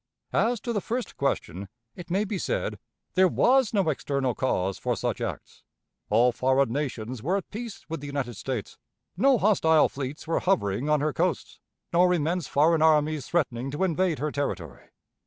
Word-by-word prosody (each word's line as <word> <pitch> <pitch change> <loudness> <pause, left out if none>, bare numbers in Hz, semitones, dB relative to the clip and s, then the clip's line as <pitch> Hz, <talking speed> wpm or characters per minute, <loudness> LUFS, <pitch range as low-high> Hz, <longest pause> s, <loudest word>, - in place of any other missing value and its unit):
As 235 +1 +2
to 235 - -3
the 205 - -1
first 240 +4 -4
question, 100 -8 -2 0.3
it 180 - -10
may 190 +4 +1
be 200 -2 -3
said: - - -2 0.3
There 185 0 +5
was 255 +5 +3
no 195 -5 +1
external 140 -3 -1
cause 95 -7 -1
for - - -1
such - - -2
acts. - - -6 0.5
All 125 +2 +4
foreign 130 0 +1
nations 125 -4 -3
were 180 - 0
at 195 - -7
peace 225 0 -7
with 165 0 -4
the 145 - -6
United 140 -4 -3
States. 115 +1 -5 0.4
No 265 +8 +4
hostile 170 -7 +4
fleets 140 +2 -6
were 165 - 0
hovering 145 - 0
on 150 -1 +3
her 150 -1 0
coasts, - - -2 0.3
nor 180 +1 +4
immense 165 0 -1
foreign 160 +3 +3
armies 155 -2 +3
threatening 135 -6 -1
to 145 +6 -2
invade 180 -2 +1
her 150 +1 -2
territory. 100 - -4
150 Hz, 175 wpm, -26 LUFS, 130-185 Hz, 0.5 s, There